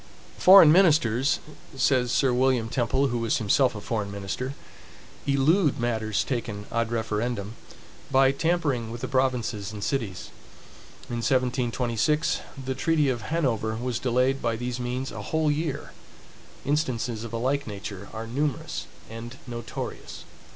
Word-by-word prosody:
Foreign 185 Hz, -5 st, +9 dB
ministers, 145 Hz, -, +4 dB, 0.4 s
says 125 Hz, -2 st, +2 dB
Sir 130 Hz, -2 st, +3 dB
William 125 Hz, -2 st, +2 dB
Temple, 130 Hz, +3 st, +1 dB
who 120 Hz, -1 st, -1 dB
was 115 Hz, -1 st, +1 dB
himself 115 Hz, +4 st, +2 dB
a -, -, -5 dB
foreign 105 Hz, -2 st, -2 dB
minister, 100 Hz, +7 st, -4 dB, 0.7 s
elude 145 Hz, +3 st, +3 dB
matters 110 Hz, -3 st, 0 dB
taken 110 Hz, -5 st, -4 dB
ad 115 Hz, 0 st, 0 dB
referendum, 110 Hz, -1 st, -2 dB, 0.6 s
by 135 Hz, 0 st, +5 dB
tampering 140 Hz, -6 st, 0 dB
with 120 Hz, +1 st, -7 dB
the 130 Hz, -, -2 dB
provinces 125 Hz, -6 st, 0 dB
and 105 Hz, -2 st, -6 dB
cities. 110 Hz, -10 st, -3 dB, 0.8 s
In 120 Hz, -, -4 dB
1726, 125 Hz, +4 st, +1 dB, 0.3 s
the 130 Hz, -, -1 dB
treaty 150 Hz, +1 st, +2 dB
of 120 Hz, -3 st, -1 dB
Hanover 115 Hz, -6 st, -1 dB
was 120 Hz, 0 st, -2 dB
delayed 130 Hz, +2 st, +1 dB
by 115 Hz, -1 st, 0 dB
these 125 Hz, +1 st, -4 dB
means 125 Hz, +2 st, -3 dB
a -, -, -6 dB
whole 155 Hz, -1 st, +1 dB
year. 155 Hz, +2 st, -3 dB, 0.7 s
Instances 125 Hz, -6 st, -1 dB
of 115 Hz, -, -7 dB
a 115 Hz, -, -2 dB
like 135 Hz, +4 st, 0 dB
nature 100 Hz, -1 st, -7 dB
are 110 Hz, +1 st, -5 dB
numerous 135 Hz, +4 st, -2 dB, 0.2 s
and 115 Hz, +2 st, -8 dB
notorious. 120 Hz, -2 st, -6 dB
125 Hz, 135 wpm, -26 LUFS, 115-135 Hz, 0.8 s, Foreign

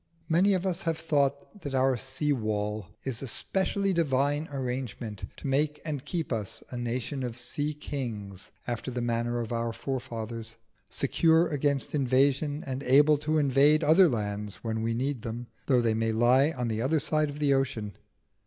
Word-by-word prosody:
Many 185 Hz, +4 st, +4 dB
of 185 Hz, 0 st, -2 dB
us 185 Hz, -1 st, -1 dB
have 165 Hz, -1 st, -1 dB
thought 145 Hz, +3 st, -1 dB
that 140 Hz, -2 st, -4 dB
our 130 Hz, 0 st, +3 dB
sea 135 Hz, +4 st, -1 dB
wall 105 Hz, -4 st, -2 dB, 0.2 s
is 130 Hz, -4 st, -4 dB
a 135 Hz, -, -4 dB
specially 195 Hz, -, 0 dB
divine 145 Hz, -1 st, +1 dB
arrangement 125 Hz, -6 st, -4 dB
to -, -, -11 dB
make 145 Hz, +2 st, +1 dB
and 145 Hz, -4 st, -3 dB
keep 160 Hz, -2 st, -2 dB
us 105 Hz, -4 st, -4 dB
a -, -, -5 dB
nation 120 Hz, +3 st, -3 dB
of 120 Hz, -2 st, -4 dB
sea 145 Hz, +4 st, -3 dB
kings 110 Hz, -10 st, -6 dB, 0.2 s
after 120 Hz, +1 st, -3 dB
the 125 Hz, -1 st, -3 dB
manner 120 Hz, 0 st, 0 dB
of 115 Hz, -, -5 dB
our 115 Hz, 0 st, -1 dB
forefathers, 115 Hz, -3 st, -5 dB, 0.3 s
secure 160 Hz, +4 st, +3 dB
against 145 Hz, -2 st, 0 dB
invasion 140 Hz, +2 st, +2 dB
and 130 Hz, 0 st, -3 dB
able 145 Hz, +3 st, +5 dB
to 155 Hz, +1 st, 0 dB
invade 145 Hz, +2 st, +4 dB
other 165 Hz, +4 st, +6 dB
lands 105 Hz, -3 st, -3 dB
when 110 Hz, -1 st, -2 dB
we 115 Hz, 0 st, 0 dB
need 130 Hz, 0 st, -1 dB
them, 115 Hz, +1 st, -5 dB, 0.2 s
though 130 Hz, -3 st, +4 dB
they 115 Hz, -2 st, +2 dB
may 115 Hz, 0 st, 0 dB
lie 125 Hz, +6 st, +4 dB
on 125 Hz, -6 st, -3 dB
the 110 Hz, -1 st, -1 dB
other 150 Hz, +6 st, +2 dB
side 155 Hz, +1 st, +1 dB
of 145 Hz, -, -7 dB
the 145 Hz, -2 st, +3 dB
ocean. 115 Hz, -7 st, -1 dB
135 Hz, 175 wpm, -28 LUFS, 115-150 Hz, 0.3 s, other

